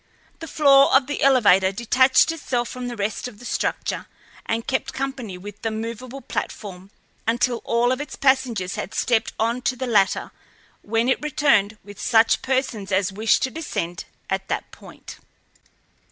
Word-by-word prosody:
The 325 - -7
floor 275 -3 +5
of 265 0 +5
the 290 +2 -4
elevator 200 -9 +5
detached 255 +8 +3
itself 250 -7 -2
from 250 -1 -6
the 240 - -5
rest 205 +2 -3
of 235 -4 -11
the 245 - -13
structure - - -2 0.4
and 225 +1 -1
kept 260 - -2
company 265 -8 -4
with 205 +2 -10
the 225 - -1
movable 230 +4 -6
platform 195 -6 -6 0.4
until 240 +1 +1
all 235 +1 +2
of 255 +2 -1
its 290 -2 -7
passengers 245 -9 +1
had 190 - -5
stepped 230 -2 +1
on 230 +3 0
to 250 +1 0
the 260 +1 -4
latter, 205 -6 +1 0.5
when 225 +3 0
it 260 - +1
returned 275 -9 +2
with 205 0 -11
such 225 -1 +3
persons 260 -7 -2
as 190 0 +1
wished 220 +3 +2
to 260 - -1
descend 175 - -4 0.2
at - - -2
that - - -3
point. - - -13
235 Hz, 165 wpm, -23 LUFS, 205-260 Hz, 0.5 s, floor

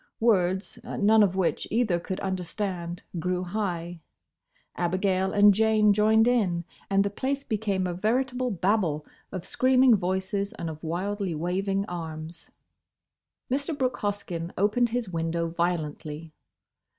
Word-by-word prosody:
Words, 190 -4 +1
none 215 +2 +3
of 190 -3 +3
which 190 -3 0
either 220 -7 +1
could 185 +2 -5
understand, 180 -2 -3 0.2
grew 180 +1 -1
high; 175 -3 -3 0.8
Abigail 185 +2 0
and 205 0 +6
Jane 215 0 +4
joined 220 +2 +4
in, 190 -9 +1 0.2
and 195 0 +3
the 200 - -2
place 275 +6 -2
became 205 -5 -1
a 180 - -2
veritable 250 +6 0
Babel 180 -6 0 0.3
of 185 -2 -5
screaming 255 -1 +4
voices 190 +2 -1
and 170 -7 -4
of 155 +1 -11
wildly 185 +2 -2
waving 195 +4 -1
arms. 160 -2 -7 1.0
Mr. 285 +3 -1
Brooke 255 -2 0
Hoskyn 185 -5 -3
opened 215 +5 +2
his 240 -1 -2
window 165 0 -1
violently. 160 -2 -3
190 Hz, 125 wpm, -27 LUFS, 175-215 Hz, 1.0 s, and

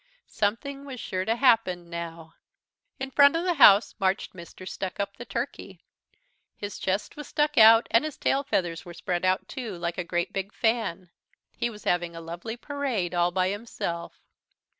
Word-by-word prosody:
Something 255 +7 -2
was 270 -3 -8
sure 185 -3 -3
to 225 - +1
happen 225 -9 +3
now. 170 -1 -7 0.7
In 265 0 -4
front 285 +2 +6
of 330 - 0
the 360 -1 +1
house 210 -8 +7
marched 190 +1 0
Mr. 185 +1 -11
Stuckup, 200 +1 -4
the 240 - -8
Turkey. 230 -8 -5 0.8
His 205 -1 -6
chest 190 +2 -2
was 295 - -8
stuck 295 -1 0
out 225 0 +8
and 230 - +5
his 310 -2 -5
tail 275 - +1
feathers 175 -11 -1
were 175 -1 -10
spread 175 0 -2
out 185 +1 +1
too, 230 -8 -6
like 170 +1 -3
a - - -1
great 175 0 -2
big 195 +1 -4
fan. 205 -6 -1 0.4
He 240 - -1
was 210 -2 -11
having 175 -1 0
a - - -6
lovely 175 +8 -6
parade 255 -10 -2
all 175 0 +2
by 185 +1 +1
himself. 200 -5 -5
200 Hz, 175 wpm, -27 LUFS, 175-240 Hz, 0.8 s, out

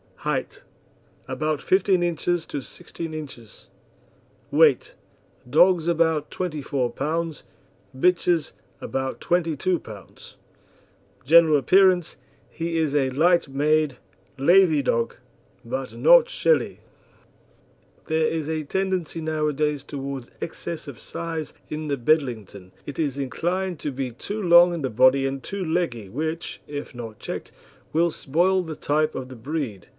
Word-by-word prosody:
HEIGHT - - -2 0.7
About 155 -1 -2
15 190 -1 +3
inches 175 0 -1
to 145 - -4
16 165 +3 -8
inches. 130 -8 -10 0.8
WEIGHT - - +4 0.6
Dogs 170 +3 +4
about 160 -3 +1
24 145 -7 -2
pounds; 160 +2 -3 0.5
bitches 175 0 +2 0.3
about 135 0 -3
22 175 0 0
pounds. 105 -4 -13 0.9
GENERAL 160 +1 +6
APPEARANCE 185 +4 +3 0.3
He 165 0 -3
is 155 -3 0
a 135 -3 +2
light 170 +5 +3
made, 145 0 +1 0.4
lathy 160 0 +5
dog, 115 -2 0 0.5
but 130 +2 -4
not - - +6
shelly. 485 -1 +1 1.2
There 160 0 +1
is 160 -2 -2
a 160 -1 -2
tendency 185 0 -2
nowadays 150 -2 -1
towards 135 -3 -6
excess 165 -1 -6
of 140 -4 -9
size 165 -2 -5 0.2
in 155 0 -4
the 140 -1 -1
Bedlington. 115 - -1
It 145 - -7
is 145 -4 -1
inclined 175 +6 -2
to 150 - -3
be 130 -1 -4
too 205 - -6
long 175 -1 +6
in 165 -4 -4
the 130 - 0
body 130 +4 +4
and 135 0 -3
too 195 +4 -4
leggy, 160 - -1
which, 160 - -4
if 145 -2 -6
not 115 -3 -8
checked, - - -6 0.4
will 170 +2 +2
spoil 175 +7 +1
the 160 -3 -6
type 155 +2 0
of 130 - -5
the 130 - -9
breed. 120 - -4
155 Hz, 130 wpm, -24 LUFS, 135-170 Hz, 1.2 s, GENERAL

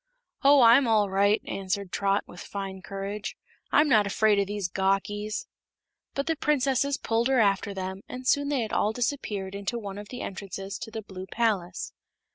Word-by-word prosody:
"Oh, 280 -1 +7
I'm 235 +3 +7
all 210 -3 +3
right," 200 +2 +3
answered 195 0 -3
Trot, 200 0 +1
with 175 - -12
fine 195 -1 -6
courage; 200 +3 -5 0.3
"I'm 300 +1 +5
not 215 -7 +4
afraid 210 +1 +3
of 200 - +1
these 205 -2 -2
gawkies." 195 +3 -1 0.7
But 275 - -1
the 325 - 0
princesses 280 -2 +1
pulled 230 +1 0
her 265 -1 +3
after 200 -1 +2
them 190 0 -5
and 255 0 -7
soon 285 +2 +2
they 280 -4 +1
had 220 - -4
all 215 - +2
disappeared 220 -6 -2
into 200 +4 -3
one 200 -3 -6
of 205 - -9
the 250 - -6
entrances 195 0 -6
to 225 - -6
the 220 0 -6
Blue 190 -1 -8
Palace. 200 -7 -1
205 Hz, 180 wpm, -27 LUFS, 195-240 Hz, 0.7 s, Oh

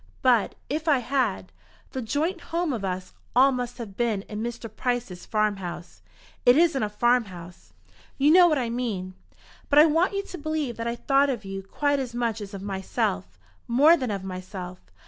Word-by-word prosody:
"But, 245 -4 +3
if 310 +3 -3
I 295 -3 +5
had, 245 -7 -1 0.4
the 260 - -4
joint 315 - -1
home 335 -3 -2
of 220 -5 -4
us 185 -1 -4 0.2
all 265 +2 +6
must 245 -1 -4
have 220 -6 -8
been 220 -3 0
in 210 0 -6
Mr. 235 0 -4
Price's 245 -8 -3
farm 215 -2 +1
house." 175 -2 -8 0.4
"It 245 +2 +6
isn't 320 -5 +3
a 210 - 0
farm 240 +3 +2
house." 175 -2 -12 0.5
"You 285 +2 +4
know 355 +1 +8
what 305 -3 +2
I 240 -3 -1
mean. 210 -7 -3 0.6
But 285 - +3
I 300 - +10
want 330 +5 +2
you 395 0 -1
to 365 - -8
believe 305 -5 -2
that 230 0 -3
I 235 - -1
thought 275 +3 +2
of 235 -6 -3
you 195 0 -5
quite 285 +9 0
as 250 -3 -4
much 230 -2 -1
as 200 0 -7
of 195 - -7
myself, 95 - -2 0.3
more 285 +8 +6
than 260 -7 -3
of 200 -2 -3
myself. 185 -1 -7
240 Hz, 195 wpm, -26 LUFS, 195-280 Hz, 0.6 s, I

